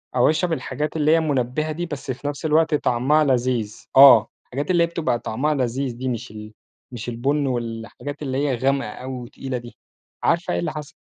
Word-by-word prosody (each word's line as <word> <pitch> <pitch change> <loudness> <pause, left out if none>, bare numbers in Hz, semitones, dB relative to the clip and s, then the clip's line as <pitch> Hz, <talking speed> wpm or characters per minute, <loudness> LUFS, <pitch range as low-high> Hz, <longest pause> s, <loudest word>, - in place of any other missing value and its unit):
أو 125 - +4
اشرب 165 +2 +1
الحاجات 150 0 -3
اللي 155 0 +2
هي 165 - +5
مُنَبهة 150 0 -1
دي، 175 +3 -3
بس 145 -4 -5
في 135 +3 -6
نفس 145 +2 -4
الوقت 160 0 +3
طعمها 145 +4 +2
لذيذ. 125 -5 0
آه، 135 -5 +9 0.2
الحاجات 145 +7 -3
اللي 170 -1 +4
هي - - +2
بتبقى 165 -8 -1
طعمها 140 +8 -1
لذيذ 130 -1 -2
دي 130 0 -3
مش 115 -3 -4
ال 105 0 -10 0.4
مش 120 0 -6
البُنْ، 140 +4 0
والحاجات 120 +4 -5
اللي 135 -2 -2
هي 140 -3 +1
غامقة 135 -2 0
أوي 130 +4 -7
وتقيلة 125 +1 -5
دي. 120 0 -11 0.5
عارفة - - +1
إيه 85 - 0
اللي 85 - -2
حصل؟ 150 -2 -8
135 Hz, 195 wpm, -22 LUFS, 120-150 Hz, 0.5 s, آه